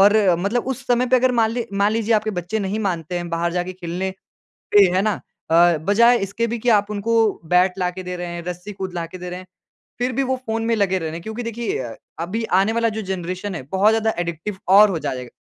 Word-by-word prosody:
और 205 +1 +7 0.3
मतलब 215 +7 -1
उस 265 - -4
समय 245 +1 +2
पे 255 +1 +4
अगर 255 0 +3
मान 225 -2 +2
लें 235 +1 -2
मान 205 +2 +3
लीजिए 225 0 +1
आपके 215 0 +1
बच्चे 180 +3 -3
नहीं 200 +1 -2
मानते 175 -3 -2
हैं 175 0 -4
बाहर 170 +1 -1
जाके 180 +1 -2
खेलने 180 +1 -4 0.6
पे, 205 -1 +8
है 190 - +3
ना? 210 -2 -1 0.3
अ, 170 0 +5
बजाए 230 +9 +4
इसके 200 +4 -2
भी 230 0 -3
कि 245 - 0
आप 205 -2 +3
उनको 215 +3 -1 0.4
बैट 180 +1 +4
लाके 180 +1 -2
दे 180 0 -5
रहे 175 0 -4
हैं, 170 0 -5
रस्सी 180 +3 -6
कूद 190 -1 -5
लाके 170 +2 -5
दे 180 0 -7
रहे 180 - -6
हैं। 185 - -13 0.5
फिर 250 +1 0
भी 275 - 0
वो 260 0 0
फ़ोन 225 0 -1
में 230 - +2
लगे 190 -3 +1
रह 165 - -4
रहे 155 - -6
है। - - -6
क्योंकि 220 +5 -6
देखिए 230 -4 -3
अ, 120 -3 -5 0.3
अभी 210 +7 -2 0.2
आने 215 +3 +1
वाला 230 0 +1
जो - - -2
जेनरेशन 185 +1 -4
है 160 - -5
बहुत 200 +3 +4
ज़्यादा 220 0 +1
एडिक्टिव 175 +4 -4 0.2
और 210 -1 +7
हो 170 - -1
जाए 145 -3 -3
जाएगा, 125 -1 -8
195 Hz, 250 wpm, -21 LUFS, 175-225 Hz, 0.6 s, पे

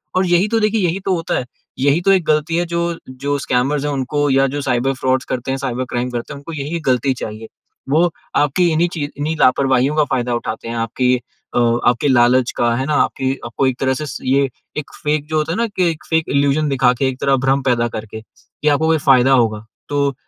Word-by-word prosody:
और 185 +1 +2
यही 175 +3 +3
तो 225 +1 +1
देखिए, 215 0 +1
यही 170 +3 -2
तो 195 - +1
होता 165 -1 -2
है, 125 - -3 0.3
यही 140 +5 +2
तो 195 - +5
एक 185 -4 +3
गलती 155 +2 +1
है। 175 - +1
जो 170 0 -2
जो 140 +2 -2
स्कैमर्स 135 +3 0
हैं 145 - -1
उनको, 145 +2 -1
या 135 0 +3
जो 145 - -2
साइबर 130 0 0
फ्रॉड्स 130 0 +1
करते 130 +1 -3
हैं 135 - -1
साइबर 130 -2 -3
क्राइम 120 +1 -2
करते 120 +3 -5
हैं, - - -8
उनको 145 +4 -9
यही 155 +3 -3
गलती 130 +1 +2
चाहिए। 110 +1 -7 0.4
वो 165 +5 +3 0.3
आपकी 150 +5 +2
इन्हीं 165 +2 +2
ची 160 - -3
इन्हीं 150 +3 -2
लापरवाहियों 130 +2 +3
का 155 - +4
फ़ायदा 125 -1 0
उठाते 115 -1 -5
हैं, 115 - -4
आपके 120 +2 +1 0.4
अ, - - +3 0.3
आपके 125 +4 0
लालच 125 -1 +4
का, 120 -1 +2
है 130 +2 -1
ना? 150 - -1
आपकी, 130 -2 +1
आपको 120 +3 0
एक 130 -1 -1
तरह 130 -1 +1
से - - -3 0.2
ये, 135 +1 +3 0.3
एक 150 - -5
फ़ेक 150 0 0
जो 155 0 -1
होता 155 +1 0
है 170 - -2
ना, 235 - +1
कि 185 -4 0
एक 155 - -9
फ़ेक 160 -1 +1
इल्यूज़न 140 +2 +2
दिखा 130 -2 +3
के, 130 +2 0
एक 130 0 -7
तरह 135 -1 +3
भ्रम 135 +1 +2
पैदा 120 -2 +1
करके, 110 0 -7 0.4
या 150 - +5
आपको 160 +3 +1
कोई 160 0 +3
फ़ायदा 130 -1 +5
होगा। 110 -4 +1 0.2
तो 140 -1 +1
140 Hz, 230 wpm, -18 LUFS, 125-155 Hz, 0.4 s, तो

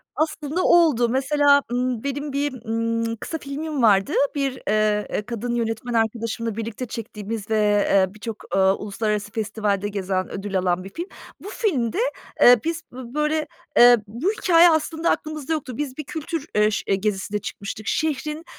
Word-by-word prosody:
Aslında 310 +2 -1
oldu. 305 -9 +4
Mesela, 285 +3 +4
ımm, 245 -2 -1
benim 280 +1 -3
bir, 285 0 -1
ımm, 230 0 -1
kısa 320 +8 -5
filmim 290 0 -4
vardı. 195 -3 +4 0.2
Bir, 275 -2 0 0.2
eee, 210 0 +2
eee, - - -1
kadın 240 +1 -3
yönetmen 230 +1 -2
arkadaşımla 230 0 -1
birlikte 230 +2 -4
çektiğimiz 220 -1 -6
ve, 220 - +2 0.3
eee, 190 -1 +3
birçok, 215 +1 -6
ııı, 190 0 +4
uluslararası 210 0 -2
festivalde 205 -2 -1
gezen, 190 -2 -2
ödül 195 -1 -2
alan 180 0 0
bir 190 - -8
film. 345 +2 -5 0.3
Bu 405 - -9
filmde, 345 - -1 0.4
eee, 245 -1 +8
biz 330 +1 -2
bö 245 -1 -9
böyle, 300 +1 0 0.3
eee, 245 0 +9
bu 245 - -1
hikâye 350 -6 +5
aslında 320 +1 0
aklımızda 310 -1 -2
yoktu. 285 -6 -4
Biz 275 -3 -4
bir 305 - -4
kültür, 315 +1 -5
eee, 210 0 +4
ş 200 -1 0
gezisinde 205 +1 -2
çıkmıştık. 210 +1 -7
Şehrin, 305 +1 -1
235 Hz, 160 wpm, -23 LUFS, 210-300 Hz, 0.4 s, eee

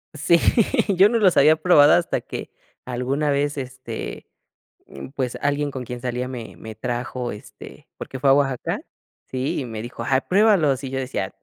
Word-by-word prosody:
Sí, 170 +3 +3 0.6
yo 195 +3 +8
no 230 +1 +1
los 190 -5 +4
había 155 +3 +6
probado 155 -2 +6
hasta 175 - +1
que, - - -7 0.4
alguna 130 +4 -1
vez, 145 +1 0
este, 130 -3 -6 0.6
mm, 70 - -9
pues, 130 -3 -2
alguien 145 0 0
con 130 -2 -6
quien 125 0 -7
salía 125 0 -3
me 125 -3 -8
me 110 0 -9
trajo, 120 +2 -4
este, 105 - -12
porque 130 - -7
fue 135 +1 +3
a - - +7
Oaxaca 135 -3 0 0.5
Sí, 130 +1 -2
y - - -4
me 110 -2 -6
dijo: 120 0 -7
"Ay, 130 +2 +2
pruébalos", 180 - +3
y 135 - -4
yo 135 0 -3
decía: 125 -7 -4
135 Hz, 180 wpm, -22 LUFS, 125-145 Hz, 0.6 s, yo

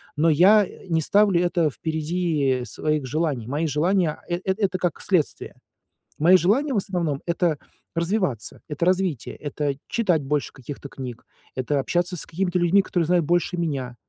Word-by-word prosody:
но 160 +2 +3
я 195 +6 +6 0.2
не 165 -1 +2
ставлю 200 +1 +3
это 175 -3 +2
впереди 155 -3 -1
своих 150 -1 -2
желаний. 145 -4 -1
Мои 150 +5 -1
желания, 165 +3 +1
э 175 0 -2
это 190 -1 0
как 175 -3 -1
следствие. 180 -7 -1 0.6
Мои 175 +5 +7
желания, 255 - +1
в - - +1
основном, 170 -7 -1
это 170 -3 +1 0.4
развиваться, 170 - -1
это 150 +3 -1
развитие, 185 -7 0
это 145 -1 -3
читать 180 -10 +1
больше 145 +1 -1
каких-то 140 +1 -8
книг, 125 -3 -8 0.3
это 135 +2 0
общаться 175 +6 0
с - - -1
какими-то 180 +1 -1
людьми, 175 +3 +4
которые 175 -3 0
знают 175 -2 +2
больше 175 +2 +1
меня. 135 -7 -2
165 Hz, 155 wpm, -24 LUFS, 145-180 Hz, 0.6 s, Мои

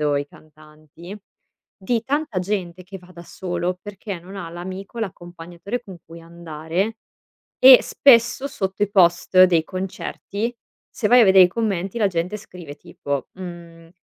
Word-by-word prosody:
o 145 -1 +1
i 140 - -1
cantanti. 155 +4 -15 0.7
Di 230 +3 -1
tanta 285 -5 -2
gente 185 -2 -4
che 195 +2 -10
va 180 0 -19
da 170 0 -12
solo 175 0 -4
perché 200 -2 -7
non 190 +3 -12
ha 175 -4 -6
l'amico, 190 +6 -8
l'accompagnatore 175 +2 -7
con 195 -6 -11
cui 165 +1 -12
andare. 170 +5 -4 0.6
E 260 -1 +10
spesso, 250 +1 +3
sotto 195 -7 -5
i 205 - -2
post 185 -1 +4
dei 170 -3 +3
concerti, 195 +4 -5 0.4
se 215 - -2
vai 245 +3 +6
a - - +7
vedere 190 -1 +7
i - - +1
commenti, 195 -1 -3
la 205 - +3
gente 180 +3 -3
scrive 175 -7 -11
tipo: 145 -5 -6
mhmm, 170 -2 -11
185 Hz, 155 wpm, -21 LUFS, 170-205 Hz, 0.7 s, E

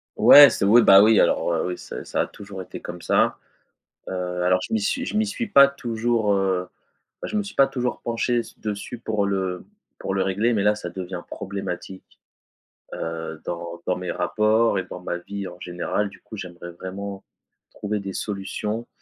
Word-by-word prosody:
Ouais, 145 -1 +10
c'est - - -1
oui, 115 +4 +7
bah, 100 -2 +8
oui, 110 0 +5
alors, - - +2
heu, - - 0
oui, 90 - -4
ça - - -8
ça - - -1
a - - -1
toujours 100 -2 -9
été - - -9
comme 85 0 -8
ça, - - +2 0.7
heu, - - -4 0.3
alors 90 +1 +3
je - - -5
m'y 225 - +2
suis 260 +5 -1
je 215 - -2
m'y 220 - +2
suis 230 +3 -3
pas 140 -9 +7
toujours, 115 -5 0
heu 95 -2 0 0.5
bah, - - -4
je - - -3
me 210 - 0
suis 200 - -9
pas 135 0 +5
toujours 125 -2 -3
penché 120 +1 0
s - - -11
dessus 105 +3 -5
pour 110 -3 -1
le 95 -2 -2 0.4
pour 95 - -3
le 95 - +1
régler. 100 +6 +1
Mais 105 - +1
là, 105 0 +4
ça 95 -4 -6
devient 90 0 -6
problématique, 95 -1 -7 0.8
heu, 80 -1 -5
dans 85 0 -6
dans 90 - 0
mes 90 -1 -4
rapports 105 +4 +2
et - - -2
dans 90 - -9
ma 90 -1 -3
vie 100 +2 -6
en 90 - -13
général. 90 +4 -2
Du - - -17
coup 110 - -10
j'aimerais 85 -2 -8
vraiment 95 +3 -7 0.5
trouver 105 0 -3
des 100 -1 -6
solutions 105 +2 -4
100 Hz, 200 wpm, -23 LUFS, 90-115 Hz, 0.8 s, Ouais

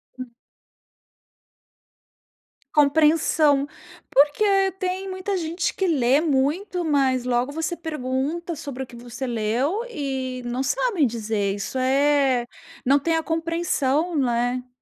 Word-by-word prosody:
Hum. 255 -2 -8 2.4
Compreensão. 300 -1 +3 0.4
Porque 290 +8 +4 0.4
tem 375 +1 -2
muita 375 +1 -3
gente 335 +1 -2
que 385 - -1
lê 275 -2 +3
muito, 325 +6 0
mas 270 -4 +2
logo 250 +2 0
você 325 +3 -2
pergunta: 310 +2 -3
"Sobre 280 -4 -6
o - - -8
que 240 - -13
você 240 +2 -7
leu?" 245 - -1
e 265 - -4
não 240 +2 -2
sabem 475 - +1
dizer, 215 -3 -2
isso 205 +6 -5
é, 270 -1 +2 0.4
não 275 +3 +4
tem 325 +3 0
a 320 - 0
compreensão, 330 -1 0
não 265 -4 +1
é. 245 +1 -1
285 Hz, 120 wpm, -23 LUFS, 255-330 Hz, 2.4 s, Porque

